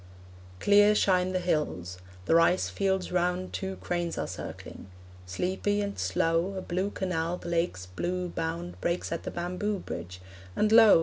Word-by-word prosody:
Clear 205 +1 +6
shine 185 -2 +3
the 185 - 0
hills; 150 - -1 0.3
the - - +2
rice 165 +2 +4
fields 190 -2 0
round 180 +1 0
Two 190 -1 -3
cranes 175 -2 -3
are - - -1
circling; - - -8 0.4
sleepy 190 - -1
and 200 -1 -3
slow, 175 +2 +1
A 190 - -3
blue 185 +3 -1
canal 180 -3 -2
the 170 - -7
lake's 170 - -1
blue 180 - -3
bound 170 +1 -4
Breaks 175 +1 -1
at 165 - -2
the - - -5
bamboo 180 +4 -2
bridge; 90 - -7 0.4
and 210 0 +2
lo! 225 -5 +8
180 Hz, 160 wpm, -28 LUFS, 165-190 Hz, 0.4 s, lo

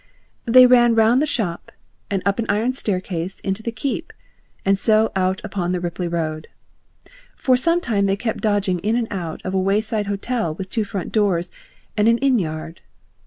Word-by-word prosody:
They 255 +2 +8
ran 240 -2 +5
round 225 +4 +4
the 305 - +1
shop 200 - -3 0.4
and 195 -2 -1
up 200 +2 +1
an 230 - -1
iron 220 +5 +1
staircase 185 -6 -2
into 195 +2 -2
the 230 - -3
Keep, 270 +8 -4 0.5
and 195 0 +3
so 220 0 +3
out 185 0 +1
upon 185 -4 -2
the 180 - -1
Ripley 175 0 -3
road. 155 -2 -3 0.9
For 255 - +2
some 335 +7 +2
time 205 - 0
they 195 - +1
kept 225 +1 -3
dodging 205 -4 +1
in 215 +6 0
and 235 -2 0
out 175 -5 -5
of 185 - -3
a 190 - +2
wayside 210 +2 0
hotel 200 -4 -2
with 190 +1 -7
two 220 -2 -1
front 195 -3 -5
doors 185 -5 +1 0.4
and 210 0 +2
an 230 0 +4
inn 260 -2 +2
yard. 160 -1 -5
205 Hz, 185 wpm, -21 LUFS, 185-230 Hz, 0.9 s, They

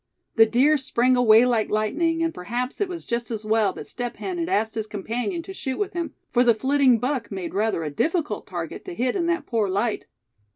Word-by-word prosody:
The 225 -1 +6
deer 275 +7 +3
sprang 255 -1 +2
away 235 -1 +6
like 235 -4 +1
lightning, 325 +11 0
and 330 0 0
perhaps 245 - -4
it 410 - +2
was 350 -2 -6
just 235 -1 -2
as 220 -2 -4
well 215 -2 +2
that - - -8
Step 245 -1 -5
Hen 365 -2 -4
had 335 +1 -2
asked 220 - +1
his 220 -1 -3
companion 235 - -3
to 385 - -8
shoot 265 -8 -4
with 415 - -2
him; 340 -2 -4 0.2
for 245 - +4
the 235 -2 +4
flitting 265 +1 +3
buck 250 0 -2
made 190 -4 -5
rather 210 -4 0
a 150 - -3
difficult 320 - -1
target - - -6
to 365 - -7
hit 250 -3 0
in 345 -3 0
that 340 0 0
poor 220 -5 0
light. 205 +4 -1
245 Hz, 220 wpm, -24 LUFS, 220-325 Hz, 0.2 s, The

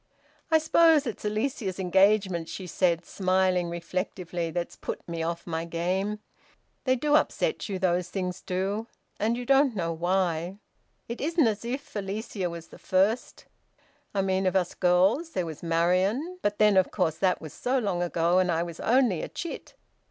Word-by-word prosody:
"I 320 - +6
suppose 315 -1 +4
it's 230 -3 -5
Alicia's 215 -3 -2
engagement," 190 -2 +3
she 190 - -6
said, 175 -1 +1
smiling 185 -2 +1
reflectively, 175 0 -3
"that's 170 +1 -4
put - - -6
me 170 -1 -4
off 170 +1 -3
my 165 -1 -3
game. 185 +5 -1 0.7
They 255 -1 +3
do 295 +4 0
upset 425 - +1
you, 195 - -2
those 180 -1 0
things 180 -2 -3
do, 195 +5 -2 0.3
and 225 +3 +1
you 245 - -5
don't 275 -1 +4
know 165 -3 -1
why... 175 +1 0 0.5
It 235 - -5
isn't 325 0 +2
as 215 -1 0
if 260 +3 -5
Alicia 200 -1 -3
was 170 -1 -8
the - - -14
first 195 +6 0 0.7
I 195 -1 0
mean 190 0 +1
of 185 - 0
us 180 -2 +1
girls. 190 - +2
There 180 - -1
was 160 -3 -7
Marian; 185 - +1
but 205 0 0
then, 210 -2 +5
of 190 - +4
course, 165 -5 0
that 185 -2 +2
was 155 - -9
so 255 +2 0
long 200 -8 -1
ago, 175 +1 +2
and 180 -1 +2
I 165 0 +1
was 170 -1 -8
only 235 -8 +2
a - - -4
chit." 340 - -7
190 Hz, 175 wpm, -27 LUFS, 175-220 Hz, 0.7 s, I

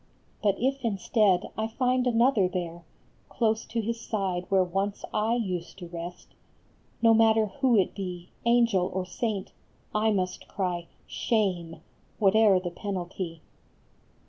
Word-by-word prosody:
But 200 -2 +3
if, 270 +2 0
instead, 200 -3 +2
I 220 0 -1
find 250 +2 +1
another 235 -4 +4
there 175 -2 -5 0.4
Close 220 -2 0
to 230 0 -2
his 230 +1 -3
side 190 -5 -2
where 190 -1 +4
once 195 +3 -2
I 215 +2 +1
used 185 -8 -3
to 180 -3 -8
rest, 170 +1 -7 0.7
No 225 0 +7
matter 220 -1 +5
who 250 +3 +2
it 190 - +2
be, 180 -3 -6 0.2
angel 230 -6 +3
or 185 -1 -1
saint, 200 +2 -3 0.4
I 215 +1 +2
must 185 -3 -2
cry 175 -3 -2
" - - -34
Shame! 185 -8 -1 0.2
" - - -36
whate 200 -1 +4
er 210 -4 +6
the 180 -1 -5
penalty. 180 -3 -5
200 Hz, 145 wpm, -27 LUFS, 180-225 Hz, 0.7 s, No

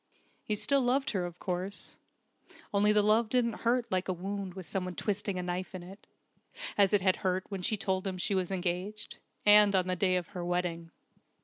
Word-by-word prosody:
He 215 - -1
still 275 +6 +2
loved 260 +3 +1
her, 185 -4 -1
of 175 0 -11
course, 185 +2 -4 0.7
only 205 +1 +4
the 210 -1 +4
love 215 +2 +3
didn't 235 -2 +1
hurt 240 +1 +2
like 185 0 0
a 185 - 0
wound 190 +1 -5
with 185 -3 -8
someone 180 -2 -3
twisting 200 -2 -2
a 180 - -2
knife 180 +1 -4
in 180 - -7
it, 190 +3 -13 0.7
as 200 -2 +4
it 205 - +3
had 185 -1 +2
hurt 185 0 0
when 195 -2 -4
she 215 +4 0
told 190 -1 -1
him 185 -1 -3
she 185 - -1
was 185 -2 0
engaged, 190 +3 -3 0.3
and 210 -1 +8
on 185 -1 +3
the 185 0 -1
day 185 +1 +2
of 180 -2 -2
her 180 -3 -6
wedding. 175 -1 -2
190 Hz, 205 wpm, -30 LUFS, 180-210 Hz, 0.7 s, and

